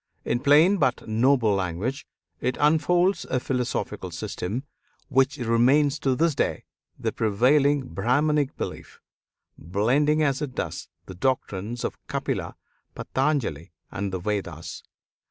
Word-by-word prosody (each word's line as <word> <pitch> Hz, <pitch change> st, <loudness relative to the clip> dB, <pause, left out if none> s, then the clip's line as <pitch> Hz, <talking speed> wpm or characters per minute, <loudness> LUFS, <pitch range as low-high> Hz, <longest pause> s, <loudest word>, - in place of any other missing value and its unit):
In 120 Hz, -, 0 dB
plain 155 Hz, +9 st, +5 dB
but 130 Hz, -9 st, 0 dB
noble 115 Hz, 0 st, +3 dB
language 95 Hz, +8 st, -2 dB, 0.3 s
it 125 Hz, -, -1 dB
unfolds 175 Hz, +5 st, +3 dB
a 130 Hz, -, -1 dB
philosophical 125 Hz, -1 st, -3 dB
system 110 Hz, +9 st, -4 dB, 0.5 s
which 135 Hz, +2 st, +2 dB
remains 130 Hz, +5 st, +3 dB
to 135 Hz, -2 st, +1 dB
this 165 Hz, +3 st, +2 dB
day -, -, -1 dB, 0.3 s
the -, -, -2 dB
prevailing 135 Hz, +7 st, +3 dB
Brahmanic 140 Hz, -, +1 dB
belief, -, -, -6 dB, 0.6 s
blending 135 Hz, -, +2 dB
as 140 Hz, -1 st, +1 dB
it 140 Hz, -4 st, -4 dB
does -, -, -4 dB, 0.2 s
the 95 Hz, -, -9 dB
doctrines 115 Hz, 0 st, -2 dB
of -, -, -4 dB
Kapila, -, -, -3 dB, 0.4 s
Patanjali, 130 Hz, -, -1 dB, 0.2 s
and 100 Hz, -1 st, -3 dB
the 95 Hz, -, -2 dB
Vedas. 85 Hz, -4 st, -4 dB
130 Hz, 120 wpm, -25 LUFS, 105-145 Hz, 0.6 s, plain